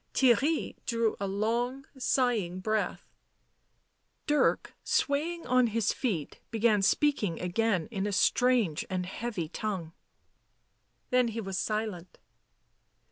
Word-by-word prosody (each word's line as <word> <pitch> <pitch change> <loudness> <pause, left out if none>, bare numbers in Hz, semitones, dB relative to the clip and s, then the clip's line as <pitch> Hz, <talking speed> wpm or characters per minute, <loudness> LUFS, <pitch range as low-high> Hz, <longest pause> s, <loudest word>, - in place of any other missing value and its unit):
Theirry 275 +5 +2
drew 230 -2 +1
a 200 - -2
long 235 +7 -1
sighing 240 -8 +1
breath; 215 +3 -1 1.2
Dirk, 295 -1 +2
swaying 325 +4 0
on 255 -1 +4
his 220 -1 0
feet, 195 - -3
began 225 -2 +2
speaking 205 - +2
again 180 0 0
in 200 -2 -2
a - - -1
strange 225 -3 +2
and 185 -1 -2
heavy 195 -3 -4
tongue. 180 -2 -4 1.2
Then 250 -1 +4
he 230 0 -4
was 195 -4 -3
silent. 210 -5 -3
220 Hz, 110 wpm, -29 LUFS, 190-250 Hz, 1.2 s, on